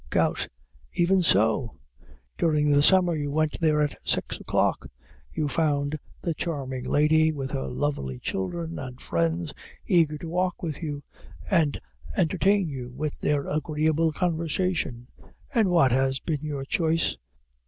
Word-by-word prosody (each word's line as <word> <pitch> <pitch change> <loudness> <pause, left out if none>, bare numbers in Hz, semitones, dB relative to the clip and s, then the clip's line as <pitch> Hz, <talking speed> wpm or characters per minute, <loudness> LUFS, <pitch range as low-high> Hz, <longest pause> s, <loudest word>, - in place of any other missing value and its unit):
GOUT. - - +1 0.5
Even 185 +2 +3
so. 115 - +3 0.7
During 150 -3 +2
the 145 0 +5
summer 180 +2 +5
you 145 -2 -2
went 155 +1 0
there 155 -2 +3
at 145 - -1
six - - -1
o'clock. - - 0 0.4
You 150 - -1
found 145 0 0 0.2
the 170 - 0
charming 135 -6 -4
lady, 155 +2 +4
with 135 -3 -4
her 65 0 -2
lovely 65 - -2
children 165 - -3
and 130 -1 -7
friends, 85 -3 -1 0.3
eager 160 -4 +3
to 165 - -7
walk 180 +2 -1
with 155 -3 -4
you, 145 -3 -4 0.5
and 160 -6 +2 0.4
entertain 190 +2 +2
you 130 -4 -5
with 145 +4 -4
their 145 -1 +1
agreeable 155 +1 +1
conversation; 165 -6 -1 0.5
and 225 -6 +3
what 165 -7 +4
has 135 +1 +2
been 150 -4 -2
your 145 -3 -4
choice? 165 +2 +1
150 Hz, 140 wpm, -26 LUFS, 135-165 Hz, 0.7 s, the